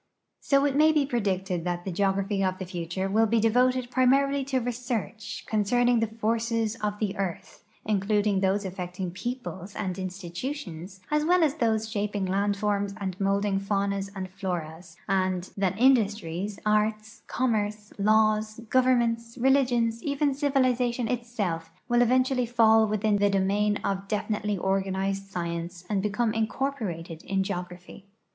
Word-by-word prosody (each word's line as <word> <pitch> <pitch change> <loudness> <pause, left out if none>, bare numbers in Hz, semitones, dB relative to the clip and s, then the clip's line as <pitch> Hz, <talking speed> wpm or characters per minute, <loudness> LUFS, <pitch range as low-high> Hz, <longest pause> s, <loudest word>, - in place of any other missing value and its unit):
So 275 0 +2
it 280 -2 +1
may 310 +2 +6
be 300 -2 +2
predicted 190 - -1
that 175 0 -2
the 190 - -3
geogra|)hy 195 +2 0
of 185 0 0
the 185 - -5
future 175 +1 -3
will 220 +3 +3
be 230 +1 +2
devoted 250 +3 +2
primarily 275 +2 +3
to 270 -1 0
research 240 -3 -4
concerning 240 +3 +2
the 225 - +1
forces 225 0 -1
of 210 -1 -2
the 205 -2 -2
earth, 190 -4 -5 0.2
including 205 -1 +1
those 195 +1 +1
affecting 180 -1 -5
peoi)les 205 -2 -6
and 190 -2 -3
institutions 185 - -6
as 300 0 +2
well 355 +2 +4
as 295 -3 +3
those 225 -7 0
shaping 205 -2 -2
land 200 +2 0
forms 200 -1 -1
and 190 -3 -3
molding 195 0 +1
faunas 200 0 -1
and 190 -1 -4
floras, 175 -3 -5
and 185 -1 0
that 195 -1 0
industries, 210 -6 +2
arts, 215 +1 0
commerce, 210 -4 -1
laws, 215 +1 +2
governments, 235 -2 +2
religions, 245 -3 +2
even 285 +1 0
civilization 255 -4 +1
itself, 215 -9 -2 0.2
will 240 -1 +3
eventually 255 +1 +2
fall 225 -2 +5
within 210 0 +1
the 205 0 +3
domain 200 +2 +1
of 195 0 -2
defi 210 +1 -1
nitely 210 -2 -2
organized 195 +1 -1
science 170 -1 -5
and 200 -2 +1
become 215 +2 0
incorporated 215 - -3
in 195 0 -1
geography. 180 +1 -7
210 Hz, 145 wpm, -27 LUFS, 190-240 Hz, 0.2 s, may